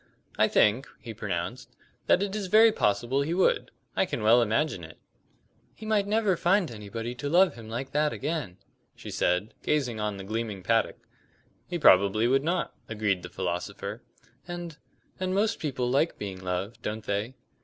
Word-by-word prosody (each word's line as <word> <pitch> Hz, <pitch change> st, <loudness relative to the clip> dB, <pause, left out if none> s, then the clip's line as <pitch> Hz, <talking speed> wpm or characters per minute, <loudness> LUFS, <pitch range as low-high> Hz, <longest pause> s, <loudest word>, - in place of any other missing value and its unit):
"I -, -, +4 dB
think," 115 Hz, +7 st, +3 dB
he 115 Hz, -, -8 dB
pronounced, 105 Hz, +2 st, -4 dB, 0.3 s
"that -, -, +4 dB
it 200 Hz, 0 st, -3 dB
is 205 Hz, -3 st, -3 dB
very 220 Hz, +3 st, +7 dB
possible 120 Hz, -, +1 dB
he 160 Hz, +4 st, -1 dB
would. 185 Hz, -, +2 dB, 0.3 s
I -, -, +2 dB
can -, -, -3 dB
well 115 Hz, +3 st, +6 dB
imagine 115 Hz, -, 0 dB
it." 80 Hz, 0 st, -11 dB, 0.8 s
"He 220 Hz, -, -10 dB
might 210 Hz, -2 st, +1 dB
never 210 Hz, -2 st, +2 dB
find 175 Hz, -2 st, +2 dB
anybody 115 Hz, +2 st, -5 dB
to 145 Hz, +4 st, -4 dB
love 180 Hz, +4 st, +5 dB
him 115 Hz, -2 st, -11 dB
like 130 Hz, +4 st, -4 dB
that 150 Hz, +1 st, +2 dB
again," 145 Hz, -, -3 dB, 0.4 s
she -, -, -9 dB
said, 90 Hz, +5 st, 0 dB
gazing 130 Hz, -7 st, 0 dB
on 105 Hz, -1 st, -2 dB
the 95 Hz, -, -7 dB
gleaming 110 Hz, -2 st, -4 dB
paddock. 115 Hz, +3 st, +1 dB, 0.7 s
"He 175 Hz, -, -2 dB
probably 100 Hz, -, +5 dB
would 135 Hz, +2 st, +3 dB
not," 170 Hz, +3 st, -1 dB, 0.2 s
agreed 105 Hz, -4 st, 0 dB
the 90 Hz, -, -8 dB
philosopher. 100 Hz, +5 st, -4 dB, 0.5 s
"And 175 Hz, -2 st, -6 dB, 0.4 s
and 185 Hz, 0 st, -1 dB
most 215 Hz, +2 st, +1 dB
people 130 Hz, -5 st, -2 dB
like 140 Hz, +6 st, +1 dB
being 95 Hz, -2 st, -6 dB
loved, 90 Hz, +5 st, -3 dB
don't 110 Hz, 0 st, -4 dB
they?" 105 Hz, +6 st, -2 dB
120 Hz, 170 wpm, -28 LUFS, 105-165 Hz, 0.8 s, very